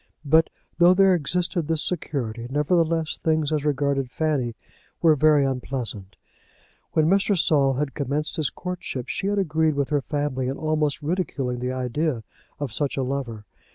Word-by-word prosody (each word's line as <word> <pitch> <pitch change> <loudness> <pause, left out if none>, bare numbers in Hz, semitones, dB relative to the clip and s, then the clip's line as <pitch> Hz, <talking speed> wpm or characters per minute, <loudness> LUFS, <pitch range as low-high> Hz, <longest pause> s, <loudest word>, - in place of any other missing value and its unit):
But 160 +3 +4 0.3
though 175 +1 +7
there 195 0 +5
existed 175 +1 0
this 160 -2 +2
security, 120 -9 -3
nevertheless 160 +2 +1
things 160 -2 +1
as 150 -2 0
regarded 140 -2 0
Fanny 135 -5 -1 0.4
were 165 -2 +5
very 150 -1 +4
unpleasant. 125 -7 -4 0.8
When 155 - +3
Mr. 195 +2 +3
Saul 140 -5 +3
had 140 +1 -2
commenced 145 +2 -2
his 155 -3 +1
courtship, 180 -8 -5
she 195 - -2
had 205 0 0
agreed 160 -4 +1
with 140 -1 -1
her 145 -2 +1
family 145 -3 -2
in 135 - -3
almost 155 -1 0
ridiculing 145 -7 -2
the 125 +1 -2
idea 130 0 -1 0.4
of 140 -6 -4
such 140 +3 -2
a 135 - +1
lover. 125 -5 -4
145 Hz, 155 wpm, -24 LUFS, 130-160 Hz, 0.8 s, though